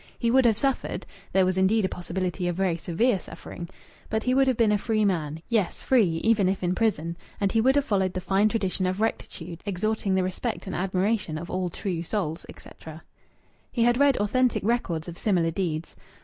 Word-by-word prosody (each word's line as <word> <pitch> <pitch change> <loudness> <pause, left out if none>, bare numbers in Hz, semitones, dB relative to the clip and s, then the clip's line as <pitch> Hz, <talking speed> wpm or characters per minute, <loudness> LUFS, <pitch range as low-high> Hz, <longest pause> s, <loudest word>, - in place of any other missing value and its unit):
He 235 -2 +1
would 260 0 +5
have 225 -3 +4
suffered 270 +2 -1 0.3
there 190 -1 +4
was 185 0 +1
indeed 200 +2 +3
a - - +2
possibility 180 0 -3
of 175 - -1
very 185 -2 +1
severe 190 +6 +1
suffering 170 0 -9 0.4
but 220 0 -1
he 250 - +1
would 270 +1 +4
have 255 -3 +2
been 225 -3 +4
a 210 - +3
free 215 0 +1
man 160 -4 -1
yes, 220 -6 0
free 195 -11 +2
even 215 -4 +3
if 190 0 -2
in 180 0 +1
prison, 175 -6 0 0.2
and 200 -1 +1
he 225 - +3
would 265 +4 +4
have 285 -1 +2
followed 190 -5 +1
the 185 - -2
fine 195 +3 +2
tradition 190 -4 -1
of 185 +2 -2
rectitude, 175 -6 -3
exhorting 200 0 -1
the 190 - +2
respect 200 +5 -3
and 190 - -4
admiration 190 -2 0
of 170 +2 -7
all 185 -1 -1
true 175 -1 -3
souls, 170 -3 -3
etc. 160 0 -11 0.7
He 235 - +1
had 240 +1 +3
read 280 -2 +4
authentic 245 +3 +1
records 190 -8 -1
of 175 -1 -8
similar 175 -6 +2
deeds. 165 -2 -3
190 Hz, 205 wpm, -26 LUFS, 175-225 Hz, 0.7 s, would